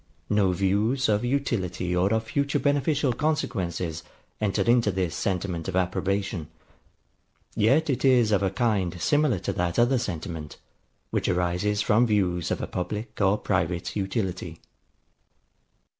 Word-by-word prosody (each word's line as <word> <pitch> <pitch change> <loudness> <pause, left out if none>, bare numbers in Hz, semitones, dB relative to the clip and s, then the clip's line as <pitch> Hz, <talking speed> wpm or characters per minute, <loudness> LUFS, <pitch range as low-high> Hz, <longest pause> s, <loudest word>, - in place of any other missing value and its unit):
No 100 -3 +3
views 100 +8 +1
of 105 +1 +2
utility 115 -9 -1
or 95 +3 +2
of 110 0 +1
future 140 +5 0
beneficial 145 -1 +1
consequences 90 - -2 0.4
enter 105 -3 +1
into 120 -2 +3
this 90 -3 -1
sentiment 90 -3 -2
of 95 - -3
approbation; 95 -2 -1 1.1
yet 130 +9 +3
is 125 -5 +3
it - - +5
of 100 - 0
a 95 - +2
kind 95 -4 0
similar 145 - +2
to 95 - -3
that 85 -1 -1
other 120 +2 +3
sentiment, 85 -7 -5 0.5
which - - 0
arises 90 +4 0
from 120 +2 +3
views 90 -6 +1
of - - -2
a - - 0
public 105 +5 -5
or 100 +1 +3
private 90 -4 -1
utility. 95 -4 -3
100 Hz, 135 wpm, -26 LUFS, 90-120 Hz, 1.1 s, it